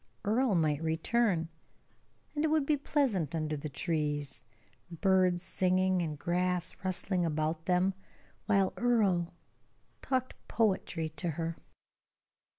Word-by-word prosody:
Earle 225 +1 +2
might 155 -3 +1
return, 165 +2 +1 0.9
and 295 - -1
it - - +3
would 310 -2 +2
be 300 - +3
pleasant 250 - 0
under 155 -1 -1
the 150 +1 -5
trees, 145 -4 -2 0.5
birds 185 0 +2
singing 185 0 +2
and 155 -3 -3
grass 180 +2 -1
rustling 185 0 0
about 155 0 -1
them, 185 +1 +3 0.5
while 195 -3 +3
Earle 200 -8 +2 0.7
talked 255 -1 -1
poetry 190 -7 0
to 170 - -1
her. 165 +1 -3
180 Hz, 115 wpm, -31 LUFS, 160-205 Hz, 0.9 s, it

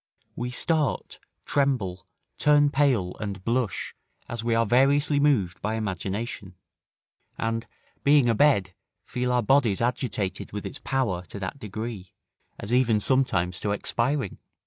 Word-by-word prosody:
We 120 +1 -3
start, 150 +4 -1 0.3
tremble, 100 -11 0 0.3
turn 145 -1 +4
pale, 130 -11 +2
and 100 -3 -5
blush, 115 -3 -1 0.3
as 120 -1 -5
we 115 -1 +1
are 115 0 +3
variously 140 +5 +3
moved 105 - +2
by 110 +2 -1
imagination; 100 -1 -4 0.8
and, 115 +1 -2 0.4
being 140 -3 +5
a 115 - +4
bed, 110 -8 +3 0.3
feel 125 0 -2
our 125 -1 +2
bodies 120 -4 +3
agitated 115 -6 -2
with 105 - -5
its - - -6
power 125 -10 0
to 100 - -8
that 95 +9 -5
degree, 110 -3 -6 0.5
as 105 +4 -3
even 120 -4 +3
sometimes 95 -9 +1
to 105 - -1
expiring. 120 +2 -1
115 Hz, 135 wpm, -26 LUFS, 100-135 Hz, 0.8 s, being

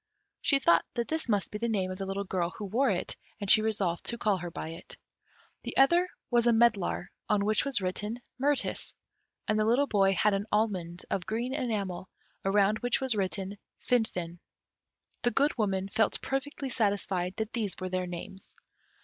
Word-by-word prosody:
She 280 - +3
thought 170 -11 +4
that 235 -1 -2
this 315 -5 -1
must 205 -3 +1
be 210 - -4
the 235 - 0
name 190 -4 0
of 185 - -6
the 195 - -3
little 195 +1 -2
girl 180 -3 -1
who 210 - -5
wore 235 +8 +2
it, - - -2 0.2
and 200 - -4
she 215 - +8
resolved 200 -6 -1
to 235 - +1
call 210 -4 +1
her 175 -1 -5
by 160 - -6
it. 165 - -9 0.6
The - - -6
other 345 +7 +5 0.2
was 240 0 +3
a - - +6
medlar, 225 -6 +2 0.2
on 205 -2 +2
which 215 0 +2
was 275 -7 +2
written 210 +5 -2 0.2
"Mirtis;" 285 0 0 0.5
and 215 0 +2
the - - +3
little 240 +6 +3
boy 195 -6 +3
had 210 +3 +3
an 195 +2 -1
almond 185 -5 -1
of 185 - -1
green 235 +4 -2
enamel, 200 -8 -2 0.3
around 200 +2 +3
which 245 -1 +1
was 265 -2 +2
written 195 0 -2 0.2
"Finfin." 180 -8 -1 0.8
The 240 - +3
Good 285 +4 +2
Woman 195 -4 0
felt 220 +2 +1
perfectly 270 0 -3
satisfied 200 -5 0
that 220 0 -3
these 215 -5 -1
were 185 0 -3
their 185 0 -1
names. 180 +2 -7
210 Hz, 185 wpm, -29 LUFS, 190-235 Hz, 0.8 s, she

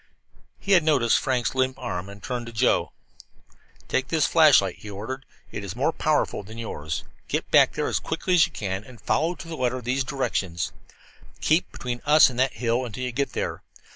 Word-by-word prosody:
He 200 - -4
had 180 -4 +6
noticed 135 -7 +3
Frank's 125 -2 0
limp 130 0 0
arm, 95 -7 -4
and 100 0 -11
he - - -7
turned 120 -3 -3
to - - -7
Joe. 115 +3 +2 1.0
"Take 130 - 0
this 160 -3 +2
flashlight," 145 - +5
he 105 - -9
ordered. 110 +7 -6 0.3
"It - - -5
is 100 0 -6
more 135 +6 +1
powerful 155 -7 0
than 110 +3 -11
yours. 80 -9 -4 0.2
Get - - -2
back - - +6
there - - -1
as - - 0
quickly 185 - -2
as 180 -1 +6
you - - -18
can, 95 -1 -4
and 120 0 -14
follow 165 +4 0
to 170 - -10
the 165 - -5
letter 130 -2 -1
these 125 +2 -1
directions: 95 - -2 0.7
Keep 160 +4 +2
between 120 -1 -5
us 150 -2 +6
and 125 - -6
that 130 +1 +2
hill 120 +1 0
until 125 +1 -5
you 125 - -2
get 135 +2 -2
to - - -1
it. - - -14
125 Hz, 205 wpm, -25 LUFS, 110-145 Hz, 1.0 s, had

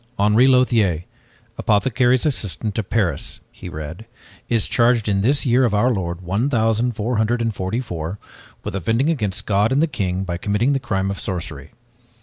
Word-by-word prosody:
"Henri 105 +5 +4
Lothiere, 115 -10 +3 0.6
apothecary's 120 +4 +2
assistant 105 - -2
of 105 - -4
Paris," 95 -10 -1
he 90 - -9
read, 80 +7 -7 0.4
"is 115 -2 +1
charged 120 -2 +2
in 100 -2 +1
this 135 +8 +2
year 125 +1 +4
of 115 -4 +2
our 120 +5 +3
lord 90 -5 -3
one 100 +9 0
thousand 115 -1 +1
four 115 +2 -1
hundred 110 +2 +1
and 115 -1 -1
forty 95 +4 -2
four 90 -6 -5 0.5
with - - -4
offending 115 - +1
against 105 - -2
God 105 +2 +2
and 135 - +2
the 160 - +4
king 95 - -2
by 85 -2 -3
committing 105 +9 +1
the 135 - +1
crime 100 -6 -1
of 100 - -5
sorcery." 90 -4 -5
110 Hz, 175 wpm, -21 LUFS, 95-120 Hz, 0.6 s, Henri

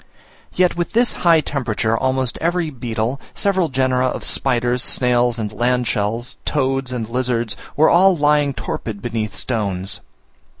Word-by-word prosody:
Yet 180 -1 +2
with 175 +3 -3
this 240 +2 +3
high 165 -2 +5
temperature, 115 -6 -1
almost 130 0 -1
every 170 -1 0
beetle, 120 0 -3
several 190 -4 +1
genera 130 -1 +1
of - - -4
spiders, 125 -1 +1
snails, 120 -1 +2
and 105 -2 -4
land 125 +2 0
shells, 115 +4 -2
toads 135 -2 -1
and 120 -3 -3
lizards 120 -3 -1 0.2
were 155 +2 +5
all 185 +1 +5
lying 145 -2 +2
torpid 110 -3 -5
beneath 110 -2 -3
stones. 100 -5 -2
125 Hz, 140 wpm, -19 LUFS, 115-145 Hz, 0.2 s, high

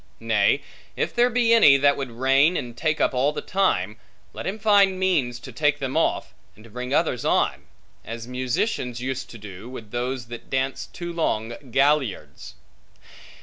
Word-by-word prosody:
Nay, - - +2 0.3
if - - -2
there 240 +1 +3
be 235 -1 +3
any, 150 -12 +7
that 140 +1 +4
would 135 -2 -4
reign 135 +8 +3
and 120 -1 -5
take 155 +2 -1
up - - +2
all 130 +3 +2
the - - -4
time, 110 - 0 0.4
let - - -6
him 195 +3 -3
find 200 -3 +4
means 145 -11 +1
to - - -10
take 150 -1 +1
them 135 -2 -4
off, - - 0 0.2
and 110 - -17
to 115 - -16
bring 125 +3 -6
others 145 -5 +1
on; - - +1 0.4
as 115 +1 -7
musicians 125 - -2
use 130 +1 -3
to 115 - -12
do, 105 +1 -10
with 115 -5 -10
those 125 +1 -3
that 120 -1 -9
dance 130 0 -2
too 175 -1 -7
long 115 -9 -1 0.2
galliards. 130 - 0
130 Hz, 175 wpm, -24 LUFS, 120-165 Hz, 0.4 s, any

